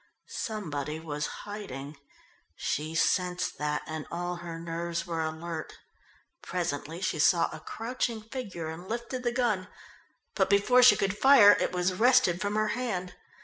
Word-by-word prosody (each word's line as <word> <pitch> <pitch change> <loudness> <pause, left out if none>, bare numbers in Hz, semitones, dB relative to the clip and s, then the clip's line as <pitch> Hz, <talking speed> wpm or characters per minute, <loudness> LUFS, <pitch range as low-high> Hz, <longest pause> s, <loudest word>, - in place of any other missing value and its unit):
Somebody 155 - -4
was 150 -2 -3 0.2
hiding. 155 -9 -7 0.6
She 155 +2 -3
sensed 180 +2 0
that 150 0 -1
and 155 -1 -6
all 175 +1 -3
her 170 -1 -7
nerves 170 +1 -3
were 165 -2 -2
alert. 160 0 -5 0.6
Presently 165 -1 -3
she 185 -4 -1
saw 170 +3 +4
a - - -7
crouching 230 -1 -3
figure 215 -8 -6
and 170 +4 -8
lifted 235 +2 -4
the 240 -1 0
gun, 225 -7 0 0.7
but 190 -1 +1
before 205 +6 +5
she 250 - +8
could 195 0 0
fire 250 -4 +8
it - - +1
was 180 +1 0
wrested 190 -5 +4
from 205 0 -1
her 215 0 +1
hand. 210 -7 -3
180 Hz, 145 wpm, -29 LUFS, 165-215 Hz, 0.7 s, she